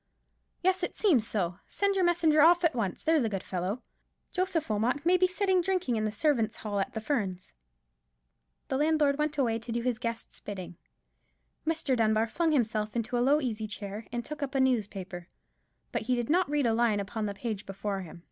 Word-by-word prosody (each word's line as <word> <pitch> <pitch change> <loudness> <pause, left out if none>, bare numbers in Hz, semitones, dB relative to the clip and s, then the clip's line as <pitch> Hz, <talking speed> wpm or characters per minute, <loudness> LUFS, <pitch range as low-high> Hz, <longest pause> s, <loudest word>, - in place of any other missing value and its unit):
"Yes, 375 +1 +2
it 355 - -2
seems 280 - +3
so. 180 -4 -1
Send 400 0 +1
your 385 -1 +1
messenger 330 -3 +4
off 345 +3 +6
at 335 - +4
once, 215 -7 -2
there's 320 -2 +3
a 225 - +1
good 195 -3 -3
fellow. 190 +6 -3 0.5
Joseph 365 -4 0
Wilmot 235 +8 0
may 355 +2 +5
be 365 0 +4
sitting 375 0 +2
drinking 365 -8 0
in 215 -1 0
the 215 - 0
servants' 225 -3 +1
hall 205 -2 -3
at 195 - -2
the 220 - -2
Ferns." 200 -8 -2 1.2
The 265 - 0
landlord 300 -1 +2
went 300 0 0
away 230 -5 +1
to 230 +1 -8
do 235 0 -1
his 245 -2 0
guest's 230 -1 -4
bidding. 185 -4 -7 0.9
Mr. 320 -5 +1
Dunbar 220 -1 +2
flung 330 +5 +1
himself 215 -6 0
into 235 +1 -1
a - - +2
low 280 +4 +4
easy 220 -5 -2
chair, 205 +1 -6
and 240 0 -3
took 300 -1 -6
up 275 -1 -3
a - - +3
newspaper. 200 -8 -1 0.6
But - - -1
he 250 +3 0
did 240 +2 -1
not 360 -1 +3
read 295 -2 +1
a 230 - +3
line 225 -2 +2
upon 210 +2 -3
the 200 - -4
page 215 -1 -4
before 195 0 -3
him. 170 -1 -10
240 Hz, 205 wpm, -29 LUFS, 210-305 Hz, 1.2 s, off